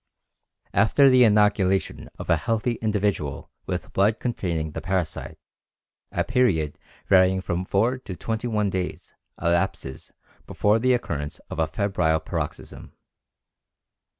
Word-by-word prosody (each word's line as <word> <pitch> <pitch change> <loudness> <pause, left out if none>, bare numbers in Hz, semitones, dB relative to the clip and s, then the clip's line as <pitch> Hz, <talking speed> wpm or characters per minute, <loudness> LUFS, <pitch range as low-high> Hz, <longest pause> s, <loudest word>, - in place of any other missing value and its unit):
After 115 +7 +5
the 130 -1 +6
inoculation 105 -3 +2
of - - -7
a 85 - +4
healthy 115 +7 -1
individual 100 -10 -1 0.2
with - - -4
blood 105 +3 +2
containing 85 -10 -2
the 80 - -6
parasite 90 -2 -3 0.7
a - - 0
period 80 -13 +1 0.3
varying 95 -1 +4
from 90 -1 -3
four 115 +7 +1
to 100 -7 -8
twenty 115 +5 -3
one 105 -3 0
days 90 -1 -4 0.3
elapses 85 -5 -1 0.4
before 105 +2 +2
the 130 +2 +3
occurrence 75 - -3
of - - -5
a 80 - +2
febrile 85 -2 0
paroxysm. - - -6
95 Hz, 125 wpm, -24 LUFS, 85-110 Hz, 0.7 s, the